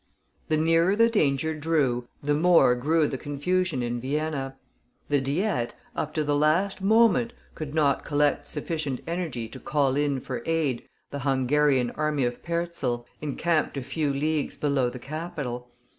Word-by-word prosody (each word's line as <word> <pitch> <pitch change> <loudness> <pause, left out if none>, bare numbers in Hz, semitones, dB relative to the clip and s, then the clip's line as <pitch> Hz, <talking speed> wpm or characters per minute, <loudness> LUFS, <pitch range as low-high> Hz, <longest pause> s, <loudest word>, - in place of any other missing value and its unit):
The 155 - +2
nearer 165 +4 +3
the 230 +2 +4
danger 155 - +1
drew, 145 -6 0 0.2
the 145 +1 +1
more 165 -4 +5
grew 150 +5 +2
the 135 - -4
confusion 145 +1 -1
in 120 0 -2
Vienna. 135 -1 -2 0.5
The 145 -2 +2
Diet, 140 - -1 0.2
up 155 - -2
to 155 - +1
the 145 0 +1
last 165 +7 +2
moment, 230 +3 +4 0.2
could 155 -1 -6
not 145 -3 +2
collect 145 -1 +1
sufficient 150 -3 -3
energy 165 -9 -3
to 130 - -9
call 140 -2 +1
in 145 -2 +1
for 125 -2 -5
aid 160 -7 -1 0.2
the 140 - -4
Hungarian 135 -1 +2
army 150 -2 0
of 120 0 -3
Perczel, 170 -8 -2 0.2
encamped 155 +1 0
a 135 - -3
few 145 +2 -1
leagues 150 +2 -1
below 140 -4 +1
the 125 - -8
capital. 135 -3 -5
145 Hz, 155 wpm, -26 LUFS, 135-165 Hz, 0.5 s, more